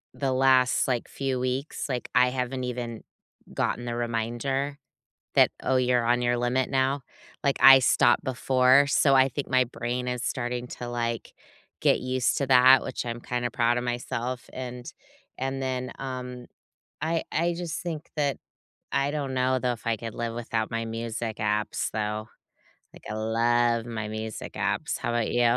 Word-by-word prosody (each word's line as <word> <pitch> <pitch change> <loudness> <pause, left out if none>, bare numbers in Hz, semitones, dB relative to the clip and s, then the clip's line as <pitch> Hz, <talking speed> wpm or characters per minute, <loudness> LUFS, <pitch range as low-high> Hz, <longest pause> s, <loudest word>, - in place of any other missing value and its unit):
the 135 -2 -1
last, 130 -1 +4
like, 125 -3 -1
few 135 -2 -2
weeks, 130 +3 -2
like, 125 -2 -3
I 125 0 +5
haven't 130 0 -2
even 120 -2 -5 0.5
gotten 120 - -1
the 120 -1 -3
reminder 120 +4 -2 0.6
that, - - +6
"Oh, 130 - +2
you're 125 -1 +2
on 120 +1 +2
your 120 0 +2
limit 120 +1 0
now." 135 +1 +1 0.4
Like, 140 - +3
I 135 0 +10
stopped 125 -1 +3
before, 130 +2 +4
so 140 0 +4
I 130 0 +5
think 140 +2 -5
my 130 -1 +4
brain 120 +1 -4
is 125 -1 -3
starting 125 0 -3
to, 120 - -5
like, 120 -1 -3 0.5
get - - +4
used 130 0 0
to 140 - -1
that, 130 0 +7
which - - -4
I'm 120 0 -4
kinda 120 0 -2
proud 120 +1 +2
of 120 - -1
myself, 120 +1 -3
and 125 -1 -6 0.5
and 135 +1 -2
then, 130 -1 -2
um, 125 -2 -6 0.5
I 165 +1 0
I 170 +2 +1
just 170 -1 -4
think 165 -3 -5
that 140 -3 +1 0.5
I 140 +1 +1
don't 145 -3 -3
know, 130 0 +2
though, 125 0 0
if 115 - -9
I 115 -1 +1
could 115 0 -6
live 115 -1 -3
without 115 -2 -2
my 115 0 -2
music 115 0 -4
apps, 105 0 -1
though, 105 0 -3 0.6
like, - - -15
I - - -3
love 115 +1 +1
my 110 -2 -4
music 110 0 -6
apps. - - -1
How - - -3
about 120 -2 0
you? 120 - +2
125 Hz, 170 wpm, -26 LUFS, 120-130 Hz, 0.6 s, I